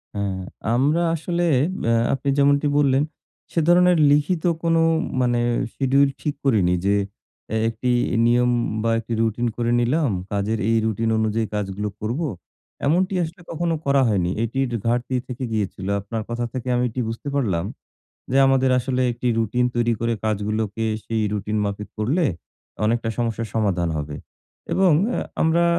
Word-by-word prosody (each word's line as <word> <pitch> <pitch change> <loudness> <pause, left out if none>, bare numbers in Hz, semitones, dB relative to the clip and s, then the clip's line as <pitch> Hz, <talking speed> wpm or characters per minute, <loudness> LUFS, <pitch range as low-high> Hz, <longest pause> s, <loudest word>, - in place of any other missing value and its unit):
হ্যাঁ, 100 -2 -2 0.4
আমরা 145 +7 +2
আসলে 175 +2 -2 0.4
অ্যা 115 - +3 0.2
আপনি 140 +1 -1
যেমনটি 140 +1 +3
বললেন 140 -1 +3 0.5
সে 165 - +1
ধরনের 180 0 +5
লিখিত 150 +3 +2 0.2
কোন 165 0 +2 0.5
মানে 120 -1 +2 0.3
schedule 135 +1 +3
ঠিক 150 -2 -1
করিনি 100 -9 +3
যে 100 +1 +3 0.5
অ্যা 110 - -1
একটি 125 +2 -2 0.4
নিয়ম 125 +1 +3 0.3
বা 115 - +2
একটি 115 +1 -5
রুটিন 115 +2 0
করে 120 0 0
নিলাম, 135 +4 +1 0.2
কাজের 105 +2 -1
এই 115 - +3
রুটিন 110 +1 0
অনুযায়ী 110 0 0
কাজগুলো 105 0 -2
করব। 115 +8 -2 0.7
এমনটি 185 +6 +2
আসলে 170 +3 -7
কখনো 165 0 -1
করা 140 0 +3
হয়নি। 90 -4 +1
এটির 130 +3 -1 0.2
ঘাটতি 120 +2 0
থেকে 125 0 -6
গিয়েছিল। 100 -3 -3
আপনার 110 +3 -4
কথা 120 0 -2
থেকে 130 0 -5
আমি 125 - +1
এটি 125 +3 -3
বুঝতে 115 +5 -6
পারলাম, 95 -11 0 0.7
যে 135 - +1
আমাদের 130 -1 +3
আসলে 130 0 -1
একটি 120 +1 -2
রুটিন 115 +3 +1
তৈরি 120 0 +2
করে 115 0 0
কাজগুলোকে 110 +1 -1 0.2
সেই 110 -1 -1
রুটিন 105 +1 -2
মাফিক 100 +1 -4
করলে, 145 +11 +1 0.6
অনেকটা 115 +1 +1
সমস্যার 115 -1 -1
সমাধান 95 -6 +1
হবে 75 -1 -4 0.6
এবং 185 -3 +4 0.2
অ্যা - - -1 0.2
আমরা 165 +1 +3
120 Hz, 150 wpm, -22 LUFS, 110-140 Hz, 0.7 s, ধরনের